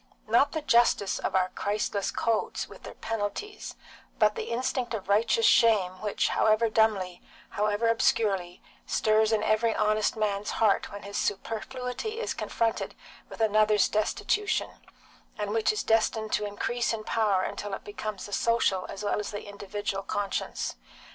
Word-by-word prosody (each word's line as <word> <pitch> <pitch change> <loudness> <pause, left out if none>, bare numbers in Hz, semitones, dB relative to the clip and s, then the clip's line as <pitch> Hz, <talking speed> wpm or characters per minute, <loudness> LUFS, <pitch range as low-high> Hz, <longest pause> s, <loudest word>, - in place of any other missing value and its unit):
Not 235 +6 +3
the 315 -2 -3
justice 235 -6 +3
of - - -2
our 185 -1 +3
Christless 205 +1 -2
codes, 225 -2 -1
with - - -13
their - - -10
penalties, 225 - -4 0.4
but 210 0 +4
the - - -4
instinct 245 0 -1
of 200 - -6
righteous 230 - +3
shame 210 - +4
which, 210 -1 0
however 220 +1 +3
dumbly, 205 -5 +1 0.3
however 210 +2 0
obscurely, 200 -5 +1 0.2
stirs 215 0 +2
in 215 -1 +2
every 220 +1 +2
honest 215 0 +1
man's 210 -1 -1
heart 215 -3 +2
when 205 0 -8
his 200 0 -5
superfluity 250 - -3
is 470 - -2
confronted 230 -1 -2 0.3
with - - -8
another's 215 -1 +4
destitution, 415 - 0 0.7
and 205 -1 -3
which 220 0 +2
is 425 - -2
destined 220 -1 +1
to 210 0 +1
increase 235 +4 -1
in 220 -1 -4
power 210 -4 +1
till 205 -1 -4
it - - -11
becomes 205 -1 -5
the 205 - -9
social 225 -4 +1
as 200 +1 -6
well 205 - 0
as 210 - -4
the 205 -1 -6
individual 200 -1 -4
conscience. 200 0 -3
215 Hz, 155 wpm, -28 LUFS, 205-230 Hz, 0.7 s, but